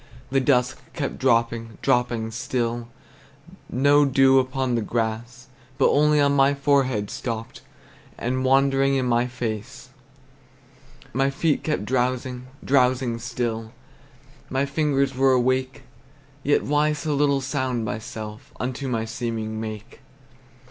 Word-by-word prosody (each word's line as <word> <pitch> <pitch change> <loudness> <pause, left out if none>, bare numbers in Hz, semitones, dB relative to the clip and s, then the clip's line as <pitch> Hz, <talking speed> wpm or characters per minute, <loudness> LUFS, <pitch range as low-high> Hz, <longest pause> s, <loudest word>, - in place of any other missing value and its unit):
The 135 - +3
dusk 125 -2 +2
kept 140 -4 -4
dropping, 115 -3 +1
dropping 120 -2 +1
still; 120 0 -2 0.8
No 145 +3 +4
dew 135 -1 +5
upon 130 -1 -1
the 115 - +1
grass, 115 +3 -3 0.3
But 135 - +4
only 150 +1 +4
on 140 0 +3
my 140 +1 +4
forehead 135 -7 +1
stopped, 115 -2 -5 0.6
And 130 +2 -1
wandered 135 +1 +3
in 135 -1 +1
my 120 0 +2
face. 125 +1 -5 1.2
My 135 +2 +2
feet 145 +2 0
kept 150 -9 -1
drowsing, 125 +1 -1 0.2
drowsing 125 -3 +2
still, 115 -2 -3 0.8
My 135 +1 0
fingers 140 -2 0
were 135 0 +4
awake; 130 +1 0 0.6
Yet 145 +2 +2
why 150 +1 +2
so 150 0 -2
little 140 -1 +2
sound 130 -4 -2
myself 105 0 -6
Unto 130 +2 -3
my 115 -3 -1
seeming 110 -1 -4
make? 110 +2 -7
130 Hz, 120 wpm, -24 LUFS, 115-135 Hz, 1.2 s, dew